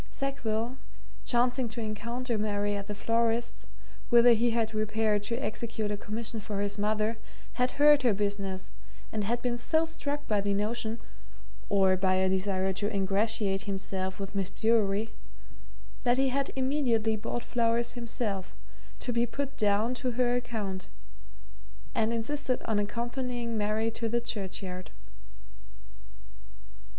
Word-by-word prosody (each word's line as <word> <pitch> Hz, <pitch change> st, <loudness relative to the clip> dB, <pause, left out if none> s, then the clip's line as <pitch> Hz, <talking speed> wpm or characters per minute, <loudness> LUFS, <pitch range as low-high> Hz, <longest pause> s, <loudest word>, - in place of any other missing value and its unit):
Sackville, 250 Hz, -3 st, -2 dB, 0.5 s
chancing 245 Hz, 0 st, +2 dB
to 225 Hz, +2 st, -6 dB
encounter 230 Hz, +3 st, -2 dB
Mary 205 Hz, -1 st, 0 dB
at 200 Hz, 0 st, -4 dB
the 210 Hz, -, -4 dB
florist's, 230 Hz, +2 st, 0 dB, 0.4 s
whither 240 Hz, 0 st, +8 dB
he 235 Hz, +2 st, +3 dB
had 225 Hz, -1 st, 0 dB
repaired 215 Hz, -1 st, +1 dB
to 230 Hz, -, -1 dB
execute 220 Hz, -3 st, -2 dB
a -, -, 0 dB
commission 220 Hz, +2 st, -4 dB
for 205 Hz, -1 st, -4 dB
his 205 Hz, 0 st, -1 dB
mother, 215 Hz, +2 st, +1 dB, 0.3 s
had 250 Hz, +1 st, +1 dB
heard 295 Hz, 0 st, +6 dB
her 245 Hz, -3 st, +4 dB
business, 200 Hz, -2 st, -1 dB, 0.4 s
and 210 Hz, -2 st, -1 dB
had 235 Hz, +3 st, -1 dB
been 240 Hz, -1 st, 0 dB
so 315 Hz, +6 st, +3 dB
struck 295 Hz, -3 st, -3 dB
by 210 Hz, -2 st, +2 dB
the 200 Hz, 0 st, +1 dB
notion 220 Hz, +2 st, -1 dB, 0.7 s
or 190 Hz, -1 st, +5 dB
by 185 Hz, 0 st, +2 dB
a 190 Hz, 0 st, +3 dB
desire 190 Hz, 0 st, +1 dB
to 205 Hz, +3 st, -1 dB
ingratiate 200 Hz, 0 st, +1 dB
himself 190 Hz, -1 st, -2 dB
with 195 Hz, 0 st, -5 dB
Miss 195 Hz, -2 st, -1 dB
Bewery 220 Hz, 0 st, +2 dB, 0.9 s
that 245 Hz, 0 st, +3 dB
he 270 Hz, 0 st, +3 dB
had 275 Hz, +1 st, 0 dB
immediately 260 Hz, -5 st, +2 dB
bought 225 Hz, +3 st, -3 dB
flowers 235 Hz, 0 st, +1 dB
himself 225 Hz, -5 st, -3 dB, 0.5 s
to 245 Hz, -, -1 dB
be 235 Hz, +1 st, +2 dB
put 280 Hz, +4 st, -3 dB
down 215 Hz, 0 st, +2 dB
to 250 Hz, -1 st, -1 dB
her 245 Hz, 0 st, +2 dB
account 210 Hz, -6 st, -3 dB, 1.1 s
and 225 Hz, 0 st, +2 dB
insisted 255 Hz, +3 st, 0 dB
on 220 Hz, -2 st, +1 dB
accompanying 240 Hz, +2 st, -2 dB
Mary 215 Hz, +1 st, +1 dB
to 230 Hz, 0 st, -2 dB
the 235 Hz, +1 st, +2 dB
churchyard. 190 Hz, -5 st, -4 dB
225 Hz, 140 wpm, -30 LUFS, 205-240 Hz, 1.1 s, whither